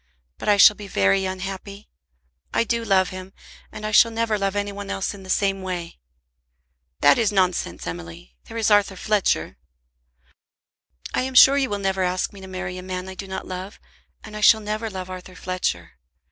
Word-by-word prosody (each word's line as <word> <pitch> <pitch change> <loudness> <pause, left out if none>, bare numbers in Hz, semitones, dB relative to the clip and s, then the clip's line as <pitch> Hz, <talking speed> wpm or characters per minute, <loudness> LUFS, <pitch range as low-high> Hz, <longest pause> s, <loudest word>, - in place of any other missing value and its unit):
But - - -2
I 205 - +5
shall 210 +1 +8
be 205 -1 -9
very 190 - +2
unhappy. 195 +2 -6 0.7
I - - +3
do 230 +1 -1
love 190 -4 +2
him, 185 +1 -9 0.4
and 210 - -8
I 215 - -2
shall 230 +2 +6
never 225 -1 -1
love 195 -1 -1
any 205 0 -1
one 200 0 -8
else 195 - -2
in 200 - -11
the 190 - -12
same 195 0 +1
way." 175 - -5 1.0
"That 145 0 +5
is 220 -3 +2
nonsense, 185 - 0
Emily. 85 -7 -8
There - - -8
is 220 -1 +1
Arthur 205 -1 +3
Fletcher." 210 +1 0 1.6
"I - - +1
am 260 0 -4
sure 270 +2 +9
you 270 -2 +1
will 205 - -2
never 195 -1 -1
ask 180 +2 -1
me 200 - -12
to 190 - -9
marry 185 -1 -5
a - - -7
man 185 0 -5
I 190 - -7
do 195 +1 -8
not 190 - -5
love, 185 +3 -7 0.4
and 215 - -10
I 210 - -5
shall 220 +1 +7
never 215 +1 -3
love 185 -2 -6
Arthur 185 0 -9
Fletcher. 85 - -3
195 Hz, 195 wpm, -23 LUFS, 185-210 Hz, 1.6 s, sure